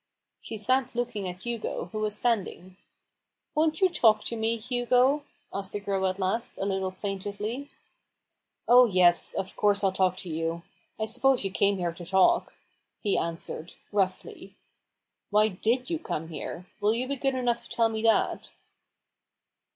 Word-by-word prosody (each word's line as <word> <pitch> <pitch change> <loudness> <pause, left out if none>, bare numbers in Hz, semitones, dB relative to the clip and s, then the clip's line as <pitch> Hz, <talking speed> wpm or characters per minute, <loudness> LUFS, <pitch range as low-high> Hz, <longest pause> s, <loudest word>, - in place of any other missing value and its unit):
She 225 - -7
sat 255 +4 +1
looking 235 -6 -2
at 180 +1 -9
Hugo, 235 -6 -4
who 215 - -4
was 215 -1 -1
standing. 195 -6 -1 0.8
"Won't 315 +3 +1
you 380 - +7
talk 225 -11 +3
to 235 - -3
me, 225 +1 0
Hugo?" 250 +4 +2 0.3
asked 195 -1 -5
the 205 - -2
girl 195 -2 0
at 185 0 -2
last, 200 +5 -1
a - - -2
little 190 -1 -1
plaintively. 205 +7 -4 1.0
"Oh, 245 +1 +8
yes, 180 -4 +4
of 190 - -3
course 205 -1 +2
I'll 195 - +3
talk 185 -1 +1
to 180 - -5
you. 165 +1 -2 0.4
I 220 - 0
suppose 250 +1 +3
you 195 - -1
came 200 +1 +2
here 175 -2 -2
to 175 - -9
talk," 190 +2 +3 0.4
he 205 - 0
answered, 165 0 -4 0.2
roughly. 190 -2 -2 0.4
" - - -58
Why 210 +1 +4
did 235 - -1
you 330 - 0
come 165 - -4
here? 165 +3 -6
Will 210 +2 +2
you 250 +2 -1
be 280 - -1
good 270 0 0
enough 240 -2 0
to - - -12
tell 230 -1 +2
me 220 -1 -3
that 225 0 +2
210 Hz, 165 wpm, -27 LUFS, 190-245 Hz, 1.0 s, Oh